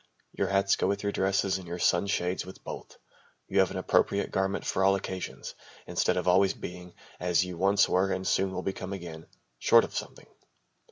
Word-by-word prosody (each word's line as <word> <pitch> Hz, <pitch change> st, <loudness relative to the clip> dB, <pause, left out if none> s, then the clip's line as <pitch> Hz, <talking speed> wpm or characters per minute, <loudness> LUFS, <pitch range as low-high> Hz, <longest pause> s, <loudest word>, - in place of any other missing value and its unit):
Your -, -, -1 dB
hats 100 Hz, 0 st, +3 dB
go -, -, +1 dB
with 100 Hz, +1 st, -1 dB
your 100 Hz, -, 0 dB
dresses 95 Hz, 0 st, +1 dB
and 90 Hz, -, -11 dB
your 85 Hz, +1 st, -4 dB
sunshades 90 Hz, +1 st, +1 dB
with 95 Hz, +1 st, -12 dB
both. -, -, -8 dB, 0.5 s
You 100 Hz, -, +1 dB
have 95 Hz, -, +4 dB
an 95 Hz, -, -5 dB
appropriate 95 Hz, +2 st, +1 dB
garment 95 Hz, +1 st, -1 dB
for 95 Hz, -, 0 dB
all 95 Hz, 0 st, +5 dB
occasions, 95 Hz, -1 st, -5 dB, 0.3 s
instead -, -, 0 dB
of -, -, -2 dB
always 95 Hz, +1 st, +4 dB
being 90 Hz, 0 st, -9 dB, 0.2 s
as 90 Hz, 0 st, +2 dB
you 90 Hz, -1 st, -6 dB
once 100 Hz, +4 st, +3 dB
were 95 Hz, +1 st, +2 dB
and 95 Hz, 0 st, -2 dB
soon 95 Hz, 0 st, +1 dB
will 95 Hz, 0 st, -4 dB
become 95 Hz, 0 st, -4 dB
again 85 Hz, -4 st, -8 dB, 0.3 s
short -, -, +6 dB
of -, -, -7 dB
something. -, -, -6 dB
95 Hz, 190 wpm, -28 LUFS, 90-95 Hz, 0.5 s, short